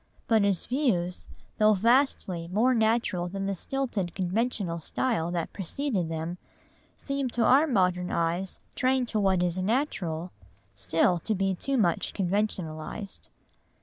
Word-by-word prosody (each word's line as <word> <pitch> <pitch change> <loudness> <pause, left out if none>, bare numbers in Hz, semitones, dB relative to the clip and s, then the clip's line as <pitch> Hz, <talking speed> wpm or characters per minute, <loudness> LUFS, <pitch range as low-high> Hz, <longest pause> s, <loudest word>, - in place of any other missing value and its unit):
But 225 -2 +4
his 200 -3 +1
views, 225 - -1 0.3
though 215 0 +5
vastly 215 -6 +2
more 220 +8 +2
natural 220 -6 +1
than 195 +2 -4
the 195 - 0
stilted 205 -4 -3
conventional 190 -2 -1
style 170 0 -1
that 175 -2 -3
preceded 200 - -2
them, 165 +2 -4 0.6
seem 275 -2 -2
to 235 -1 0
our 285 +5 +5
modern 180 - +1
eyes, 170 +3 -1
trained 255 -1 +1
to 215 - 0
what 190 -3 +2
is 175 +1 -1
"natural," 185 - -1 0.4
still 165 - +1
to 215 +6 -1
be 195 0 +1
too 270 +9 -1
much 175 -8 +1
conventionalised. 190 -1 -3
195 Hz, 135 wpm, -28 LUFS, 175-235 Hz, 0.6 s, though